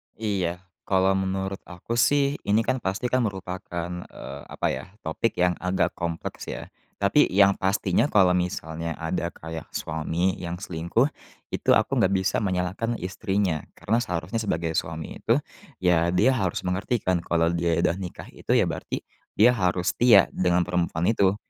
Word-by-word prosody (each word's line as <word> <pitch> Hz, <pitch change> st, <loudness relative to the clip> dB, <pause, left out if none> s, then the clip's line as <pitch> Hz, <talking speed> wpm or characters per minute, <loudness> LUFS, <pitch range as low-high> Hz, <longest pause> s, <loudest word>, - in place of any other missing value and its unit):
Iya, 95 Hz, -5 st, -2 dB, 0.2 s
kalau 95 Hz, 0 st, +3 dB
menurut 95 Hz, 0 st, -1 dB
aku, 95 Hz, +7 st, -4 dB
sih, 140 Hz, +2 st, +3 dB
ini 105 Hz, +3 st, +3 dB
kan 130 Hz, +3 st, 0 dB
pasti, 110 Hz, +4 st, -2 dB
kan 130 Hz, -, +3 dB
merupakan, 90 Hz, -3 st, -5 dB, 0.2 s
eee, 70 Hz, +2 st, -9 dB
apa -, -, -2 dB
ya, 65 Hz, 0 st, -4 dB, 0.2 s
topik 80 Hz, +8 st, -1 dB
yang 90 Hz, 0 st, +3 dB
agak 90 Hz, +1 st, 0 dB
kompleks, 85 Hz, -1 st, -5 dB
ya, -, -, -6 dB, 0.2 s
tapi -, -, +4 dB
yang 100 Hz, +1 st, +5 dB
pastinya 95 Hz, +4 st, +2 dB
kalau 95 Hz, -9 st, +4 dB
misalnya 85 Hz, -2 st, -2 dB
ada 85 Hz, +2 st, -2 dB
kayak 80 Hz, -1 st, -8 dB
suami 80 Hz, +4 st, -1 dB
yang 85 Hz, -1 st, -4 dB
selingkuh, 90 Hz, -, 0 dB, 0.4 s
itu -, -, -3 dB
aku -, -, +2 dB
nggak 95 Hz, +1 st, +3 dB
bisa 95 Hz, 0 st, +1 dB
menyalahkan 95 Hz, +4 st, -1 dB
istrinya 95 Hz, -3 st, -1 dB, 0.2 s
karena 115 Hz, +3 st, 0 dB
seharusnya 90 Hz, -1 st, -2 dB
sebagai 85 Hz, -6 st, -1 dB
suami 80 Hz, 0 st, -3 dB
itu, 115 Hz, -, +2 dB, 0.5 s
ya, 85 Hz, -2 st, +4 dB
dia 105 Hz, +8 st, +5 dB
harus 95 Hz, -9 st, -1 dB
mengerti, 95 Hz, +5 st, -1 dB
kan, 90 Hz, -1 st, +2 dB
kalau 85 Hz, 0 st, +1 dB
dia 85 Hz, -1 st, +1 dB
udah 90 Hz, -, +1 dB
nikah 90 Hz, -2 st, -7 dB
itu, -, -, -1 dB
ya, -, -, +5 dB
berarti -, -, -4 dB, 0.3 s
dia 115 Hz, +4 st, +6 dB
harus 90 Hz, -6 st, +1 dB
setia 115 Hz, -6 st, +5 dB
dengan 90 Hz, -1 st, +2 dB
perempuan 90 Hz, +1 st, 0 dB
itu. 100 Hz, -3 st, +3 dB
90 Hz, 160 wpm, -25 LUFS, 85-100 Hz, 0.5 s, dia